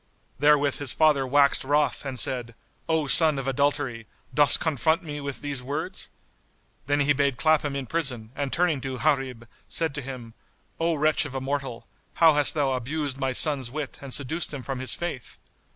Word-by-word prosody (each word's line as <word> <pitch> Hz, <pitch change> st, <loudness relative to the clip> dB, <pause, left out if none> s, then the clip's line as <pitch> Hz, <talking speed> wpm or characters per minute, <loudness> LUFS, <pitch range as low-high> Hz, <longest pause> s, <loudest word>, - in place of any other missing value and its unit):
Therewith 145 Hz, -1 st, +3 dB
his 140 Hz, -3 st, 0 dB
father 145 Hz, -4 st, +3 dB
waxed 140 Hz, +1 st, +3 dB
wroth 145 Hz, 0 st, 0 dB
and 130 Hz, -2 st, -4 dB
said, 120 Hz, -1 st, 0 dB, 0.3 s
"O 160 Hz, -2 st, +1 dB
son 155 Hz, +1 st, +4 dB
of 135 Hz, -1 st, -4 dB
adultery, 135 Hz, -4 st, -1 dB, 0.3 s
dost 145 Hz, -1 st, +6 dB
confront 160 Hz, +2 st, +1 dB
me 150 Hz, -2 st, -6 dB
with 140 Hz, -1 st, -6 dB
these 145 Hz, -3 st, -3 dB
words?" 155 Hz, +8 st, -5 dB, 0.8 s
Then 145 Hz, +1 st, +2 dB
he 145 Hz, +1 st, +3 dB
bade 140 Hz, -2 st, 0 dB
clap 155 Hz, +1 st, +3 dB
him 145 Hz, -2 st, -3 dB
in 135 Hz, -1 st, -3 dB
prison 125 Hz, -7 st, -2 dB
and 140 Hz, -2 st, -3 dB
turning 170 Hz, -5 st, +1 dB
to 130 Hz, -1 st, -5 dB
Gharib, 130 Hz, -5 st, -1 dB, 0.2 s
said 165 Hz, -3 st, -1 dB
to 145 Hz, -, -4 dB
him, 125 Hz, -3 st, -8 dB, 0.5 s
"O 165 Hz, 0 st, +1 dB
wretch 155 Hz, +1 st, +2 dB
of 135 Hz, -2 st, -8 dB
a -, -, -1 dB
mortal, 135 Hz, -3 st, -4 dB, 0.3 s
how 165 Hz, -2 st, +6 dB
hast 145 Hz, +1 st, +3 dB
thou 140 Hz, -3 st, +1 dB
abused 140 Hz, +2 st, -3 dB
my 135 Hz, -1 st, -1 dB
son's 135 Hz, -2 st, 0 dB
wit 145 Hz, +1 st, -6 dB
and 140 Hz, -1 st, -8 dB
seduced 145 Hz, +6 st, 0 dB
him 140 Hz, -4 st, -6 dB
from 135 Hz, 0 st, -4 dB
his 130 Hz, -, 0 dB
Faith?" 155 Hz, -9 st, -6 dB
140 Hz, 185 wpm, -25 LUFS, 130-150 Hz, 0.8 s, dost